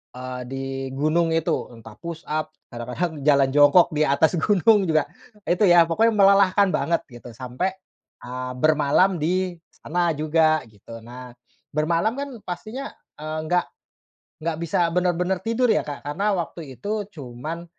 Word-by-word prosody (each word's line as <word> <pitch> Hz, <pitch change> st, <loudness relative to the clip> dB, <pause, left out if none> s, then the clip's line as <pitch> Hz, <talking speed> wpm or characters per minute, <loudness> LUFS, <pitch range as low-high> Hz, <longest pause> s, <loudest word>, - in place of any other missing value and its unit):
eee, 125 Hz, 0 st, -6 dB
di 135 Hz, 0 st, -4 dB, 0.3 s
gunung 160 Hz, +4 st, +1 dB
itu. 165 Hz, -1 st, -1 dB
Entah 110 Hz, -2 st, -13 dB
push 170 Hz, -1 st, -7 dB
up, 155 Hz, 0 st, -3 dB, 0.2 s
kadang-kadang 130 Hz, +7 st, -4 dB
jalan 140 Hz, -2 st, +4 dB
jongkok 150 Hz, +5 st, +6 dB
di 155 Hz, 0 st, +2 dB
atas 155 Hz, +5 st, +2 dB
gunung 205 Hz, 0 st, +4 dB
juga, 155 Hz, -2 st, +2 dB, 0.4 s
itu 180 Hz, +4 st, +1 dB
ya. 170 Hz, -1 st, +7 dB
Pokoknya 220 Hz, +8 st, +2 dB
melelahkan 200 Hz, 0 st, +5 dB
banget, 170 Hz, 0 st, 0 dB
gitu, 120 Hz, 0 st, -12 dB
sampai, 130 Hz, -, -3 dB, 0.5 s
eee, 125 Hz, +1 st, -5 dB
bermalam 155 Hz, +5 st, +3 dB
di 180 Hz, +2 st, 0 dB
sana 175 Hz, +1 st, -1 dB
juga, 155 Hz, 0 st, +2 dB
gitu. 110 Hz, +2 st, -12 dB
Nah, 125 Hz, +1 st, -10 dB, 0.4 s
bermalam 165 Hz, +8 st, +1 dB
kan 280 Hz, 0 st, -4 dB
pastinya, 215 Hz, +10 st, -6 dB, 0.3 s
eee, 155 Hz, +1 st, -4 dB
nggak 180 Hz, +1 st, +2 dB, 0.8 s
nggak 165 Hz, -1 st, -2 dB
bisa 170 Hz, 0 st, +1 dB
benar-benar 180 Hz, +1 st, 0 dB
tidur 230 Hz, +3 st, +1 dB
ya, -, -, +1 dB
Kak. 145 Hz, -1 st, -6 dB
Karena 195 Hz, +7 st, 0 dB
waktu 155 Hz, -4 st, -6 dB
itu, 205 Hz, -, -3 dB
cuman, 155 Hz, +2 st, -7 dB
165 Hz, 145 wpm, -23 LUFS, 140-180 Hz, 0.8 s, ya